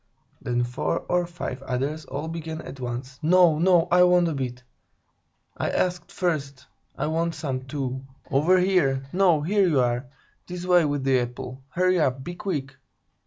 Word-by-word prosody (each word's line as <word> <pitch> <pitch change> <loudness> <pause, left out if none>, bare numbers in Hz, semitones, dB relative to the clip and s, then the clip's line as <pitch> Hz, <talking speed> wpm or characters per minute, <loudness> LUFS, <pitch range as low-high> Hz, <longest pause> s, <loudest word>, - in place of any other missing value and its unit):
Then 120 0 0
four 120 +2 -2
or 175 -1 0
five 170 -7 -6
others 135 +4 -3
all 140 +4 -5
began 160 -1 -5
at 135 - -9
once: 125 +1 -5
"No, 170 -1 +5
no, 175 -1 +4
I 180 +1 +6
want 180 -1 +5
a - - -2
bit! 125 -2 -4 0.9
I - - -2
asked 180 -1 -1
first! 140 -7 -2 0.3
I - - -1
want 165 +2 -1
some, 135 -4 -4
too! 130 -1 -4 0.3
Over 155 +7 +4
here! 180 -8 +2
No, 180 -5 +4
here 195 +3 +3
you 150 -6 +2
are! 125 +1 0 0.4
This 180 0 -6
way 180 -2 +5
with 145 -2 -1
the 135 -1 +3
apple! 125 +2 -5
Hurry 185 +4 +2
up! 130 -3 0
Be 175 - -6
quick! 150 -8 -4
150 Hz, 165 wpm, -25 LUFS, 130-175 Hz, 0.9 s, I